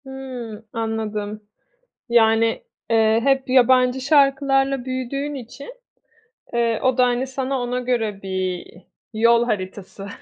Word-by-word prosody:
Hımm, 250 -5 -8
anladım. 215 -2 -3 0.7
Yani, 225 -1 +3 0.3
eee, 220 0 +4
hep 270 -1 +1
yabancı 255 0 +4
şarkılarla 275 -1 +2
büyüdüğün 265 +3 -3
için, 275 - -9 0.8
eee, 230 -2 +1
o 260 -1 +1
da, 250 - +6
hani, 245 +1 0
sana 265 0 -3
ona 245 +1 -2
göre 225 -5 -2
bir 185 -2 -3 0.5
yol 235 +2 +4
haritası, 195 -2 -5
245 Hz, 110 wpm, -21 LUFS, 220-265 Hz, 0.8 s, da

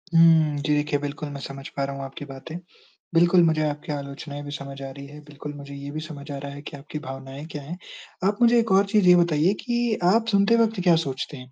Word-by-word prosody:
हुँ। 160 -3 +6
जी, 145 +1 0
देखिए 145 0 0
बिल्कुल 145 +1 -5
मैं 140 - -7
समझ 135 +1 -7
पा 140 - -3
रहा 140 0 -3
हूँ 140 - -5
आपकी 135 +2 -8
बातें। 135 +4 -8 0.6
बिल्कुल, 175 +1 +5
मुझे 160 -1 +3
आपकी 150 +1 -5
आलोचनाएँ 145 +1 -6
भी 145 - -7
समझ 140 -1 -7
आ 135 - -5
रही 140 +1 -9
हैं। 150 +1 -11
बिल्कुल, 145 0 -8
मुझे 140 0 -9
ये 140 0 -7
भी 155 - -4
समझ 150 -2 -9
आ 140 - -4
रहा 140 0 -6
है 145 - -9
कि 145 - -8
आपकी 150 +2 -7
भावनाएँ 135 0 -8
क्या 145 - -5
हैं। 165 +6 -7 0.5
आप 205 +1 +1
मुझे 240 0 +6
एक 225 -3 0
और 195 +1 +5
चीज़ 210 -4 +4
ये 180 - +9
बताइए 170 +1 +3
कि 240 -2 0 0.2
आप 225 0 +2
सुनते 200 +3 +4
वक़्त 225 -3 +2
क्या 175 -2 +6
सोचते 135 +2 -4
हैं 125 0 -12
150 Hz, 245 wpm, -25 LUFS, 140-175 Hz, 0.6 s, ये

